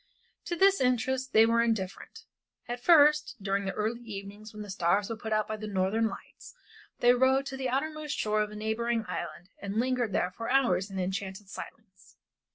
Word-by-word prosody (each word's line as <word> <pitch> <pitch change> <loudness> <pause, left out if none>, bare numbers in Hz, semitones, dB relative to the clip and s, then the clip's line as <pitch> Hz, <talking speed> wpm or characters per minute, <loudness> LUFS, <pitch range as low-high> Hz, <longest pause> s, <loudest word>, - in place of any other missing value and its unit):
To 345 - -2
this 390 +1 +4
interest 255 +1 0
they 220 +1 +6
were 230 +1 +3
indifferent. 225 - -3 0.4
At 240 +1 -4
first, 300 -4 +5
during 200 0 -1
the 195 - -1
early 220 +3 -2
evenings 205 -1 -8
when 210 -1 -8
the 205 - -7
stars 190 +3 +1
were - - -2
put 220 0 -7
out 215 -1 +1
by 215 - -4
the 215 0 -6
Northern 200 +3 +1
Lights, - - -10 0.5
they 245 0 +6
rowed 260 +2 +3
to 270 - -5
the 265 -1 -2
outermost 305 +3 -2
shore 215 0 +1
of 210 - -1
a 210 - -10
neighboring 220 +1 -1
island 180 - -6
and 200 +2 -2
lingered 250 -3 0
there 180 -1 0
for 230 +5 -6
hours 250 -7 +2
in 195 - -7
an 185 - 0
enchanted 190 +1 -5
silence. 195 -2 -11
220 Hz, 195 wpm, -29 LUFS, 200-255 Hz, 0.5 s, they